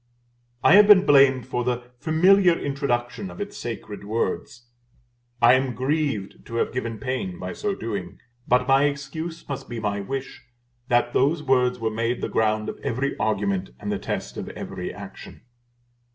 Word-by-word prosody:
I - - +6
have 205 0 +7
been 200 -2 +8
blamed 135 -3 +5
for 125 -1 -2
the 125 0 -3
familiar 175 +3 +4
introduction 140 +4 -2
of - - -11
its 205 0 -5
sacred 110 -3 -6
words. 115 +3 -3 0.8
I 120 +1 +8
am 130 -2 +1
grieved 130 -5 -2
to 115 - -7
have 115 - 0
given 115 -3 -3
pain 105 -6 -3
by 90 0 -5
so 205 -2 -2
doing; 100 - -5 0.3
but 125 +1 +3
my 135 +1 +5
excuse 145 +4 -4
must 140 - -6
be 120 -1 -4
my 105 -2 -2
wish 135 +7 -5 0.5
that 120 0 +2
those 150 +4 +2
words 125 -2 +2
were 115 -2 -2
made 115 +2 -1
the - - -2
ground 110 -1 +1
of - - -6
every 135 +4 -2
argument 100 - -1
and - - -4
the - - -2
test - - -4
of - - -5
every - - -6
action. - - -11
125 Hz, 165 wpm, -24 LUFS, 115-140 Hz, 0.8 s, been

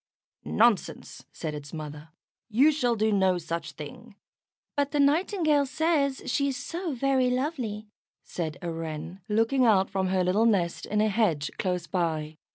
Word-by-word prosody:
"Nonsense!" 225 -2 +1
said 155 -2 -5
its 145 -1 -8
mother. 150 0 -7 0.4
"You 265 +8 +5
shall 250 -6 +1
do 220 0 +1
no 190 -3 +3
such 170 0 -4
thing." - - -10 0.6
"But 285 -1 +1
the 295 - +1
Nightingale 305 0 +3
says 290 -2 +1
she 280 - +1
is 270 -2 -2
so 340 +3 -4
very 260 0 +2
lovely," 250 -6 -2 0.4
said 160 -3 -4
a 170 - -2
Wren, 165 +3 -6
looking 225 +5 +2
out 200 -5 +4
from 190 -1 0
her 185 0 +1
little 200 +6 +3
nest 170 -6 0
in 210 0 +1
a 215 - +3
hedge 195 -9 +1
close 180 -2 -1
by. 160 -4 -2
210 Hz, 160 wpm, -27 LUFS, 170-275 Hz, 0.6 s, You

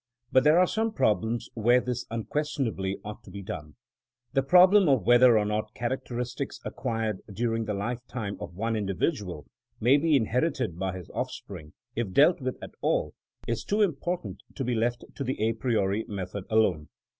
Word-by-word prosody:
But 130 - +5
there 150 +3 +5
are 180 - +6
some 220 +3 -1
problems 110 - +1
where 120 +2 +4
this 125 -1 -4
unquestionably 115 -5 -2
ought 105 +2 -8
to 105 - -13
be 100 +1 -8
done. 75 -5 -7 0.6
The 135 - +3
problem 180 +5 +6
of 130 -8 +3
whether 120 0 +7
or 105 - +2
not 110 +1 -2
charao 120 +3 -2
teristics 125 +3 -4
acquired 115 -5 -2
during 115 +2 -1
the 105 -1 -2
life 115 +5 -2
time 105 -5 -4
of 100 -5 -8
one 115 +4 -1
individual 100 - -2 0.3
may 125 +6 +5
be 155 +1 +3
inherited 120 - 0
by 95 -1 -2
his 90 - -10
offspring, 75 -1 -6 0.2
if 115 -4 -2
dealt 150 - +5
with 130 0 -3
at - - -7
all, - - 0 0.3
is 115 -1 -1
too 210 +1 +2
important 175 0 -2
to 135 - -3
be 125 0 0
left 120 +1 0
to 140 - -2
the 130 +1 -3
a 110 +2 +2
priori 110 -3 0
method 95 -1 -5
alone. 95 -9 +2
115 Hz, 180 wpm, -27 LUFS, 105-135 Hz, 0.6 s, whether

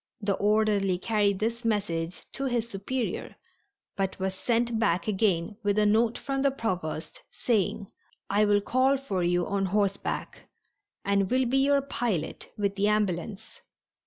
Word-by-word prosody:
The 200 -2 0
orderly 205 -2 +2
carried 205 0 +1
this 230 +4 -2
message 180 -6 -1
to 275 - -3
his 240 -3 0
superior 235 +4 -3 0.6
but 195 -1 -2
was 190 0 -2
sent 235 +3 0
back 185 -5 +1
again 200 -2 +1
with 205 -1 0
a 210 - +4
note 225 +2 +3
from 275 -1 -2
the 275 - +4
Provost, 185 -12 -4
saying: 215 -2 0 0.4
"I 205 +2 +3
will 205 0 +3
call 260 +5 +2
for 205 -9 -3
you 175 0 +1
on 195 -1 0
horseback 200 0 -2 0.6
and 200 -1 +2
will 260 0 +2
be 260 +3 +2
your 280 +1 +4
pilot 230 - -3
with 200 -1 0
the 200 +1 +1
ambulance. 205 -2 -1
210 Hz, 150 wpm, -28 LUFS, 195-235 Hz, 0.6 s, a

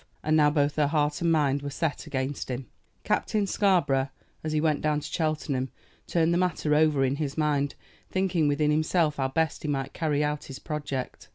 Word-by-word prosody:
And 155 +1 +2
now 150 -1 +5
both 145 -1 +1
her 150 -1 +3
heart 150 0 0
and 170 -1 +2
mind 145 -3 +2
were 145 - -4
set 145 +1 -2
against 135 +1 -3
him. 125 +1 -3 0.4
Captain 210 -2 +1
Scarborough, 165 -10 +2 0.3
as 155 - -2
he 155 - +1
went 150 -2 +1
down 150 -1 +1
to - - -7
Cheltenham, 150 -5 -1 0.4
turned 170 0 +2
the 175 - +2
matter 170 -4 +1
over 150 -3 +4
in 135 +2 0
his 145 -2 -3
mind, 145 -2 +1 0.3
thinking 185 -5 +1
within 150 +1 +2
himself 155 0 +2
how 135 -1 +1
best 160 +3 -1
he - - -4
might 135 -1 -2
carry 150 -2 0
out 150 0 -2
his 135 - -8
project. 145 -4 -5
150 Hz, 195 wpm, -27 LUFS, 140-160 Hz, 0.4 s, now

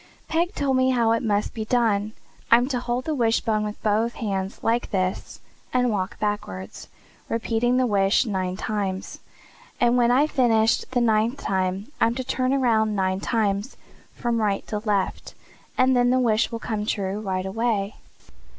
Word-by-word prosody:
"Peg 345 +4 0
told 275 -2 +1
me 260 0 +3
how 235 -3 +2
it 230 - +1
must 210 -3 0
be 220 - -4
done. 215 -3 +1 0.4
I'm 240 +2 +5
to 255 -3 -1
hold 245 +1 -2
the 315 - -1
wishbone 225 -4 +1
with 210 0 -5
both 220 +3 +1
hands, 195 -3 -3
like 235 +2 +1
this, 185 -1 -2 0.3
and 250 -1 +2
walk 195 +1 -2
backward, 100 - -3 0.6
repeating 230 +2 0
the 255 - +3
wish 200 +1 +2
nine 185 -4 -2
times. 195 -3 -3 0.6
And 240 0 +3
when 240 -1 +4
I've 280 +5 +3
finished 225 -3 +2
the 250 -1 0
ninth 225 +3 +2
time 190 +4 -2
I'm 230 +1 +3
to 260 - -3
turn 255 +1 -1
around 225 -5 +2
nine 190 -1 0
times, 210 +2 -1 0.4
from 235 -1 -1
right 200 -2 0
to 210 - -2
left, 205 -3 -2 0.4
and 260 0 +4
then 245 0 +3
the 255 +1 +3
wish 225 -2 +2
will 230 - -3
come 220 -2 -3
true 200 -1 -2
right 190 -3 -2
away." 210 0 -1
225 Hz, 170 wpm, -24 LUFS, 200-245 Hz, 0.6 s, I'm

